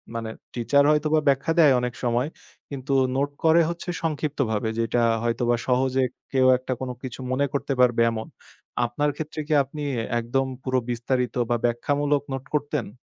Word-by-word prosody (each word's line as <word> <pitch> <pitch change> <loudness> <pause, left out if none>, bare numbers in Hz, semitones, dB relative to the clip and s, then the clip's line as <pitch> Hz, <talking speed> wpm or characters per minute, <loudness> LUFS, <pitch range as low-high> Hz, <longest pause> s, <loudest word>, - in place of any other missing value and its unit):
মানে 115 -1 -3 0.2
টিচার 140 +4 +3
হয়তোবা 155 +1 +2
ব্যাখ্যা 140 +3 +2
দেয় 145 -5 +7
অনেক 125 -1 -2
সময়, 120 +3 +1 0.4
কিন্তু 140 0 -4 0.2
নোট 140 +1 +1
করে 165 +1 +6
হচ্ছে 170 +1 -5
সংক্ষিপ্তভাবে 140 -8 -1
যেটা 115 +1 +1 0.2
হয়তোবা 120 +1 +1
সহজে 130 +1 +2 0.3
কেউ 130 -1 +3
একটা 130 0 -4 0.3
কিছু 130 0 -6
মনে 140 +2 +2
করতে 140 0 -1
পারবে 120 -2 +4
এমন। 110 -1 -5 0.6
আপনার 145 +5 0
ক্ষেত্রে 155 0 -6
কি 155 - 0
আপনি 150 +3 -9
এ্যাঁ 115 - -3
একদম 135 +3 0 0.2
পুরো 130 -1 +1
বিস্তারিত 125 0 -1
বা 120 - +3
ব্যাখ্যামূলক 145 +4 +1
নোট 135 +1 -5
করতেন? 145 -7 -2
130 Hz, 155 wpm, -24 LUFS, 120-145 Hz, 0.6 s, দেয়